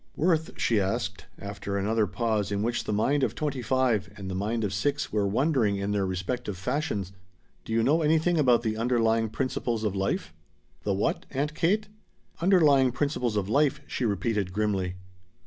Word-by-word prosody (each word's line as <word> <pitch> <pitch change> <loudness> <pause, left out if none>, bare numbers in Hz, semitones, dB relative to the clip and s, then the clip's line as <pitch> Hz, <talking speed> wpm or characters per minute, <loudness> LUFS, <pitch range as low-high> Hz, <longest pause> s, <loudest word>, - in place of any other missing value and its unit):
"Worth," 160 -1 0
she 115 -3 +2
asked, 95 0 -2
after 100 0 -5
another 105 +2 +1
pause 105 +1 -1
in 100 0 0
which 120 +1 -1
the - - -2
mind 135 +8 +2
of 130 - 0
twenty 145 -4 -2
five 120 -5 +1
and 95 -1 -6
the - - -4
mind 110 +4 -1
of 100 -2 -1
six 145 +8 -1
were 105 -2 +2
wondering 115 -1 +2
in 100 +1 -2
their 100 -2 0
respective 95 +3 -3
fashions, 100 - -2 0.5
"do - - -7
you 115 0 +2
know 150 +7 +3
anything 160 +2 +2
about 125 -5 +4
the 110 -1 -1
underlying 115 -1 +2
principles 120 -2 -2
of 105 -2 -1
life?" 95 0 -2 0.5
"The 100 - 0
what, 100 - -1
Aunt 145 +3 -2
Kate?" 200 +7 +1 0.5
"Underlying 150 -8 +5
principles 125 -4 -1
of 100 -2 -1
life," 140 +5 +2
she - - -4
repeated 105 -2 0
grimly. 95 -3 -1
115 Hz, 175 wpm, -27 LUFS, 100-140 Hz, 0.5 s, Underlying